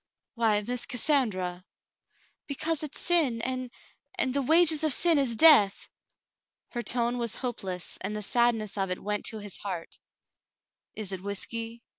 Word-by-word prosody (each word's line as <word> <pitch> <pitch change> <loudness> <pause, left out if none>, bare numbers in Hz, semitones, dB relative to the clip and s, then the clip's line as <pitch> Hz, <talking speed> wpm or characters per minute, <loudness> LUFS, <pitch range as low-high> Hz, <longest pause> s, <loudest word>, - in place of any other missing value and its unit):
"Why, 220 -4 +1
]\Iiss 245 +3 -4
Cassandra 210 -10 0 0.4
!" - - -37
"Because 305 +2 -2
it's 305 -2 -4
sin, 310 -10 +3
and 255 0 -3 0.2
— - - -31
and 260 - 0
*the 280 - 0
wages 320 +2 +4
of 310 - +3
sin 335 0 +4
is 250 -4 0
death.' 220 -9 +6 0.4
" - - -64
Her 240 - -3
tone 240 0 0
was 235 -2 -2
hopeless, 190 -8 -5
and 200 +3 -3
the 210 - -4
sadness 225 -3 +1
of 195 -1 -1
it 180 - -2
went 210 0 -3
to 220 - -2
his 205 -2 -6
heart. 180 -5 -7 1.0
"Is 210 -3 -4
it 190 -1 -5
whiskey 230 +4 -5
235 Hz, 165 wpm, -27 LUFS, 205-270 Hz, 1.0 s, death